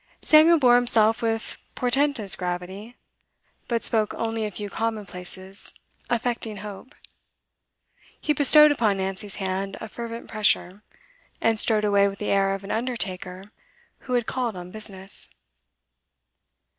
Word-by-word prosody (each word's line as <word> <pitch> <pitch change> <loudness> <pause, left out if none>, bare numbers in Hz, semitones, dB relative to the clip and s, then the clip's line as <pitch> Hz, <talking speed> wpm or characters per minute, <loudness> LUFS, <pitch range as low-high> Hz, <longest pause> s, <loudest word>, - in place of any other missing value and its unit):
Samuel 320 +2 +7
bore 245 -4 +6
himself 225 -2 +3
with 225 -1 -2
portentous 250 -5 +1
gravity, 185 +6 -5 0.7
but 235 -1 -1
spoke 215 -2 +1
only 225 -1 -2
a - - -4
few 205 0 -6
commonplaces, 195 -3 -4 0.3
affecting 235 -2 -1
hope; 210 +6 -10 1.2
he 300 - +1
bestowed 300 +1 +7
upon 220 -8 +1
Nancy's 195 +2 -4
hand 195 0 -3
a 220 - -6
fervent 230 +1 -7
pressure, 205 -2 0 0.6
and 225 -1 +2
strode 215 -2 +2
away 200 -1 +4
with 200 0 -5
the 210 - -2
air 195 0 +2
of 195 - -9
an 195 - -6
undertaker 195 -6 -3 0.7
who - - 0
had 240 -2 +2
called 245 -4 -2
on 180 0 -8
business. 195 - -7
215 Hz, 130 wpm, -25 LUFS, 195-235 Hz, 1.2 s, Samuel